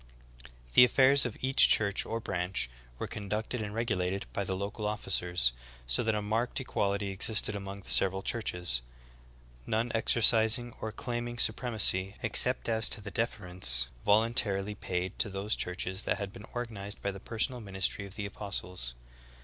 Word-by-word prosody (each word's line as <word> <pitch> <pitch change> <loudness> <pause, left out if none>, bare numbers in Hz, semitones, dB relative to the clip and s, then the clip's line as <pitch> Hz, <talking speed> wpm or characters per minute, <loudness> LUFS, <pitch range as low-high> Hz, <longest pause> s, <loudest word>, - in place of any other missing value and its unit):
The - - +8
affairs 130 +1 +5
of 115 - -9
each 130 +1 +5
church 100 -2 +2
or 115 - -3
braiich 90 - -2 0.3
were - - -4
con 100 -2 -8
ducted 110 +2 -3
and 105 - -5
regulated 100 -4 -2
by 100 - -2
the 95 -1 -3
local 105 +2 -4
officers, 90 - 0 0.3
so - - +1
that 110 -1 0
a 105 - -2
marked 115 +5 -1
equality 100 -5 -2
existed 105 +2 +1
among 100 0 -7
the - - -6
several 95 0 +2
churches, 90 - 0 0.9
none 115 +2 -1
exercis 115 0 +6
ing 120 -1 -8
or 110 - -4
claiming 120 +1 -5
supremacy 110 -5 +2
except 125 +3 +1
as 110 -1 +3
to - - -1
the 105 - -8
deference 90 - +2
vol 105 +2 +4
untarily 105 -3 +1
paid 90 -2 -4
to 105 - +2
those 100 +3 -2
churches 95 +2 -3
that - - -1
had 100 -2 -6
been 105 - -11
organized 110 -4 -6
by 100 - -1
the 95 - -9
personal 120 +4 -1
ministry 100 0 -2
of 100 - -9
the 105 -2 -4
apostles. 90 - -3
105 Hz, 165 wpm, -30 LUFS, 95-115 Hz, 0.9 s, The